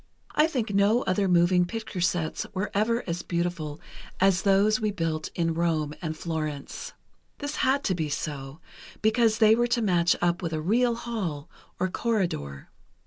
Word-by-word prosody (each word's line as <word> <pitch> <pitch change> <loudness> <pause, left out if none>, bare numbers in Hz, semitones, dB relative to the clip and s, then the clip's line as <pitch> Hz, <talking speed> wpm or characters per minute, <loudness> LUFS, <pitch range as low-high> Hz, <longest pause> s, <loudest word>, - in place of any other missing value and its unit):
I 305 +1 +4
think 240 -9 -2
no 205 +5 +3
other 195 +1 +1
moving 180 0 +4
picture 220 -2 -5
sets 170 -2 0
were 190 +3 -2
ever 230 +4 +1
as 170 -1 -3
beautiful 170 -3 -3 0.4
as 190 -1 +4
those 205 +3 +3
we 215 - +1
built 165 -5 -2
in 165 -1 0
Rome 160 -3 0
and 160 -2 -4
Florence. 155 -4 -4 0.4
This 290 0 -4
had 270 +2 +2
to 190 - +1
be 160 -4 -2
so, 140 0 -5 0.4
because 220 0 +3
they 220 -1 +6
were 240 +1 +2
to 240 0 +1
match 175 -4 +3
up 175 +1 +1
with 165 -2 -3
a 155 - -1
real 230 +8 +2
hall 195 -11 -4 0.3
or 185 - +1
corridor. 180 - -2
180 Hz, 165 wpm, -27 LUFS, 165-220 Hz, 0.4 s, they